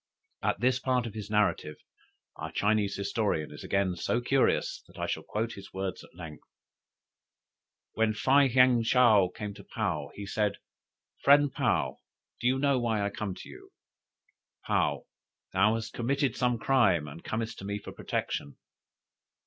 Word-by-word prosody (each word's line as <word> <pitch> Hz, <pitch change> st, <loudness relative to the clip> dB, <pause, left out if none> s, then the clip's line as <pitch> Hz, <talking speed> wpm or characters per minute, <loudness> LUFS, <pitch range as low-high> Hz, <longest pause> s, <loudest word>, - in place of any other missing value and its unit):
At -, -, 0 dB
this 125 Hz, +1 st, +3 dB
part 125 Hz, -1 st, 0 dB
of 115 Hz, -, -6 dB
his 105 Hz, -2 st, -7 dB
narrative 105 Hz, -7 st, +1 dB, 0.6 s
our -, -, -6 dB
Chinese 105 Hz, -1 st, +1 dB
historian 100 Hz, -6 st, -1 dB
is 75 Hz, -, -9 dB
again 95 Hz, -2 st, 0 dB
so 120 Hz, -, 0 dB
curious, 130 Hz, +2 st, +1 dB
that -, -, -17 dB
I -, -, -2 dB
shall -, -, -2 dB
quote 115 Hz, +2 st, -3 dB
his 100 Hz, -1 st, -11 dB
words 95 Hz, -1 st, -4 dB
at -, -, -18 dB
length. 80 Hz, -4 st, -9 dB, 1.5 s
"When 110 Hz, 0 st, +1 dB
Fei 135 Hz, +4 st, +4 dB
heung 125 Hz, -1 st, +5 dB
Chow 115 Hz, -6 st, +5 dB
came 105 Hz, +1 st, -6 dB
to -, -, -12 dB
Paou, 85 Hz, -10 st, -3 dB
he 100 Hz, -, -6 dB
said: 105 Hz, 0 st, 0 dB, 0.7 s
'Friend 145 Hz, 0 st, +5 dB
Paou, 120 Hz, -, 0 dB, 0.4 s
do 120 Hz, -, 0 dB
you 130 Hz, +1 st, +3 dB
know 140 Hz, -1 st, +2 dB
why 110 Hz, -4 st, 0 dB
I 100 Hz, -, -1 dB
come 100 Hz, -3 st, -4 dB
to -, -, -10 dB
you?'" -, -, -13 dB, 0.9 s
"Paou. -, -, +1 dB, 0.5 s
'Thou 105 Hz, +4 st, +4 dB
hast 115 Hz, 0 st, -5 dB
committed 135 Hz, +3 st, 0 dB
some 125 Hz, -1 st, +1 dB
crime 100 Hz, -, +3 dB
and 75 Hz, +4 st, -10 dB
comest 110 Hz, 0 st, -3 dB
to 95 Hz, -, -8 dB
me 100 Hz, +1 st, -2 dB
for 105 Hz, -, -9 dB
protection?'" 70 Hz, -1 st, -4 dB
110 Hz, 160 wpm, -29 LUFS, 100-125 Hz, 1.5 s, heung